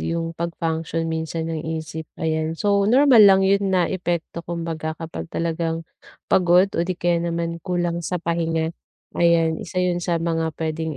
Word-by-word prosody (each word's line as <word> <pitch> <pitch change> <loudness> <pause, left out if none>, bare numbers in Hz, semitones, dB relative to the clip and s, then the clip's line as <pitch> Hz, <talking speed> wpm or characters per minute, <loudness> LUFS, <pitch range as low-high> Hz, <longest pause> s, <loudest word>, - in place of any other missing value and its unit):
yung 165 0 -2
pag-function 165 -1 -2
minsan 160 0 -3
ang 160 - -2
isip, 160 0 -5 0.2
ayan. 160 0 0
So, 200 +2 +2
normal 245 -2 +7
lang 195 -1 +6
yun 195 0 +2
na 180 -2 +2
epekto 170 -2 -3
kumbaga 165 -2 -4
kapag 160 - -6
talagang 165 0 -2 0.5
pagod 180 +1 +4
o 170 - +1
di 185 - -1
kaya 175 0 +1
naman 170 0 -2
kulang 175 -1 -1
sa 180 +1 -2
pahinga, 165 -1 0 0.5
ayan, 165 -1 +3
isa 185 - -3
yun 180 -1 +1
sa 175 -1 -1
mga 165 -2 -1
puwedeng 160 -1 -3
170 Hz, 160 wpm, -22 LUFS, 160-175 Hz, 0.5 s, normal